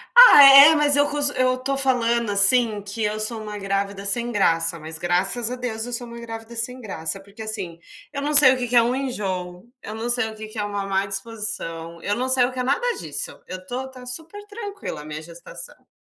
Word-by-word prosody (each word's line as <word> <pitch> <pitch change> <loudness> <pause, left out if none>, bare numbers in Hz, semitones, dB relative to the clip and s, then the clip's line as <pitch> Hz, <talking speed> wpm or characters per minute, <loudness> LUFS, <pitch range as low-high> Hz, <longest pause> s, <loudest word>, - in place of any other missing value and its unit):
Ah 485 - +10
é, 275 +3 +9
mas 295 -1 +4
eu 285 0 +2
cons 290 -1 +1
eu 255 0 +1
estou 270 +2 -3
falando, 235 -4 +1
assim, 210 +2 +3
que 205 +3 -6
eu 210 +1 -2
sou 220 +1 -4
uma 210 -1 -7
grávida 195 0 -3
sem 235 +4 0
graça, 165 -5 +1
mas 160 +1 -7
graças 195 +8 -1
a - - -3
Deus 235 -3 -5
eu 245 - -7
sou 240 0 -5
uma 235 0 -10
grávida 225 0 -9
sem 250 +3 -3
graça, 195 -4 -5
porque, 200 +3 -14
assim, 200 -6 -6 0.3
eu 280 - -4
não 295 +1 -2
sei 280 -3 +7
o - - -3
que 245 -1 -3
que 245 - -2
é 235 - +7
um 240 +2 0
enjoo, 190 -9 -5 0.2
eu 215 - -8
não 230 +2 -5
sei 240 -2 0
o 220 - -12
que 215 0 -9
que 215 +1 -12
é - - -1
uma 205 -1 -4
má 195 0 -1
disposição, 195 -5 -4
eu 205 - -2
não 255 +3 -3
sei 260 -1 +4
o 255 - -4
que 255 - -7
é - - -1
nada 475 - -1
disso, - - -3
eu 185 - -6
estou 245 +8 -6
está 255 -1 -12
super 325 +11 -6
tranquila 410 - -7
a - - -12
minha 155 0 -7
gestação. 170 +1 -12
225 Hz, 235 wpm, -22 LUFS, 195-255 Hz, 0.3 s, Ah